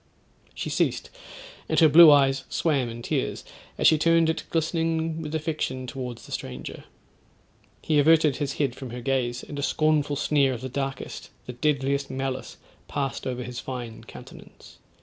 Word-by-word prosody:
She - - -4
ceased, - - -1 0.6
and - - +2
her 160 - +7
blue 160 +2 +9
eyes 135 -2 +4
swam 140 -7 0
in 115 +1 -8
tears, - - -2 0.3
as - - -1
she 155 - +6
turned 165 0 +4
it - - -6
glistening 165 0 -1
with 155 0 -5
affection 150 -5 -2
towards 125 -2 -6
the - - -14
stranger. 65 0 -6 1.0
He 155 -2 +2
averted 155 -1 +4
his 140 -2 -2
head 140 -4 -1
from 130 0 -8
her 120 +1 -7
gaze, 125 -1 -1
and 145 - -7
a - - -1
scornful 150 0 +1
sneer 140 -2 +2
of 120 - -6
the 130 - -5
darkest, 135 0 -5 0.2
the 125 - -7
deadliest 140 +1 0
malice 130 0 -4 0.3
passed 135 -3 -3
over 125 -1 -3
his 120 0 -6
fine 120 -4 -7
countenance. - - -14
140 Hz, 165 wpm, -25 LUFS, 130-155 Hz, 1.0 s, blue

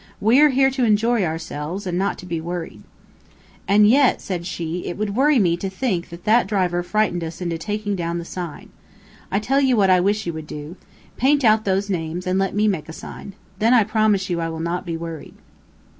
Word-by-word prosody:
We 230 +7 +4
are 300 - +7
here 270 0 +3
to 260 -1 -1
enjoy 225 0 +2
ourselves, 160 +2 -4
and 180 -2 -2
not 195 +2 0
to - - -10
be 165 -2 -3
worried." 165 -10 -6 0.9
"And 210 +1 +5
yet," 270 +4 +4
said 175 -3 -4
she, 170 -1 -4
"it 175 - -4
would 205 -1 -2
worry 285 +3 +4
me 175 -7 +3
to 195 +2 -4
think 190 -4 -2
that 170 +1 -11
that 220 -1 +4
driver 180 -4 0
frightened 180 -2 0
us 160 0 -6
into 170 -2 -3
taking 205 +3 -3
down 170 -1 -2
the 170 - -5
sign. 175 -3 -7 0.6
I 195 - +1
tell 270 +7 +1
you 260 -3 +3
what 195 -2 +4
I 185 - +5
wish 205 +3 0
you 170 - -3
would 160 -1 -7
do. 150 +3 -8 0.4
Paint 280 +3 +3
out 220 -1 +4
those 195 +1 0
names, 175 -2 -3
and 185 +1 0
let 195 0 -1
me 210 +1 +2
make 160 -7 -2
a - - -7
sign. 200 - -9 0.3
Then 230 +3 +4
I 230 - +6
promise 215 -2 +1
you 175 -2 -2
I 165 - -2
will 160 0 -6
not 170 +2 -3
be 165 -1 -3
worried." 165 -2 -8
190 Hz, 220 wpm, -21 LUFS, 170-215 Hz, 0.9 s, are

